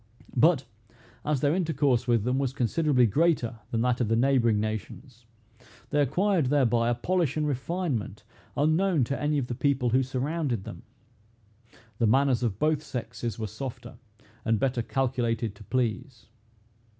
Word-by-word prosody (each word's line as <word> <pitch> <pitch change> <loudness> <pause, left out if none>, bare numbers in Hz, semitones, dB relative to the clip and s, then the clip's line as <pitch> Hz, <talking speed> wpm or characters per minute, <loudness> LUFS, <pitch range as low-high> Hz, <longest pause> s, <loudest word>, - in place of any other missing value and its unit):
But, 140 +1 +4 0.6
as 150 -3 0
their 145 0 +2
intercourse 145 -9 +1
with 115 -3 +2
them 125 +3 0
was 135 -2 -1
considerably 135 0 +2
greater 120 - +1
than 115 - -1
that 125 0 +1
of 120 - +1
the 115 - +2
neighboring 120 -3 +3
nations, 110 +3 -6 0.6
they 150 -1 +3
acquired 175 +3 +1
thereby 120 -4 +2
a 120 - +1
polish 165 +2 0
and 150 -1 0
refinement 135 - -3 0.3
unknown 160 +1 +2
to 140 +4 -3
any 150 0 +1
of 135 - 0
the 120 - -4
people 130 -1 +1
who 130 +3 +4
surrounded 135 - -2
them. 90 - -9 1.2
The 115 - +3
manners 130 +2 +3
of 110 -6 -1
both 155 +3 +1
sexes 120 -5 -5
were 110 - -3
softer, 120 +1 -7 0.4
and 115 -1 +2
better 130 -3 0
calculated 115 -2 -1
to 100 - -14
please. 125 0 -2
130 Hz, 150 wpm, -27 LUFS, 115-145 Hz, 1.2 s, But